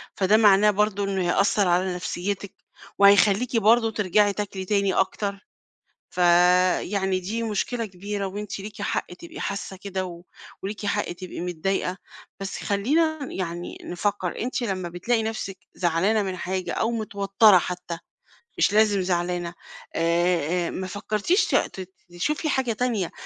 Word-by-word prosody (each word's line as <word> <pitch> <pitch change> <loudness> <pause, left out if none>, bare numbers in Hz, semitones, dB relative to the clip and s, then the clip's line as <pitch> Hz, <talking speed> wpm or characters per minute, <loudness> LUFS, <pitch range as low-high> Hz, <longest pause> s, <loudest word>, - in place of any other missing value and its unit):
فده 200 +2 +4
معناه 210 -1 +6
برضه 205 0 0
إنه 195 -1 -1
هيأثر 200 +1 +2
على 180 +1 +1
نفسيتِك، 190 +2 -4 0.4
وهيخليكِ 205 +4 +5
برضه 225 +1 +4
ترجعي 205 0 +2
تاكلي 195 -2 -4
تاني 200 -1 +1
أكتر، 200 +1 -1 0.6
فيعني 180 +2 +3
دي 215 +6 -3
مشكلة 230 +2 -2
كبيرة 200 +1 -5
وأنتِ 205 +1 -6
ليكِ 205 +1 -8
حق - - -2
تبقي 170 -1 -11
حاسة 200 -1 -4
كده، 190 -1 -4
و 175 -1 -9 0.4
وليكِ 205 +2 -5
حق 205 -1 -1
تبقي 180 +1 -8
متضايقة، 180 +2 -2 0.4
بس 195 -1 -5
خلينا 310 +11 +1
يعني 175 -1 -5
نفكر 185 0 -2
أنتِ 250 +2 -2
لمّا 190 -6 -2
بتلاقي 225 +7 0
نفسِك 220 -3 -4 0.2
زعلانة 185 +5 +2
من 190 -2 -4
حاجة 185 +1 -3
أو 225 - 0
متوترة 205 -2 +4
حتى 180 -1 -3 0.6
مش - - +3
لازم 210 -2 +4
زعلانة 175 -1 -1 0.4
آآ، 170 0 +1
ما 185 - -4
فكرتيش 210 - 0
ت 185 -1 0 0.2
تشوفي 300 - -1
حاجة 265 -4 +1
تانية 220 -6 -1
195 Hz, 135 wpm, -25 LUFS, 180-210 Hz, 0.6 s, معناه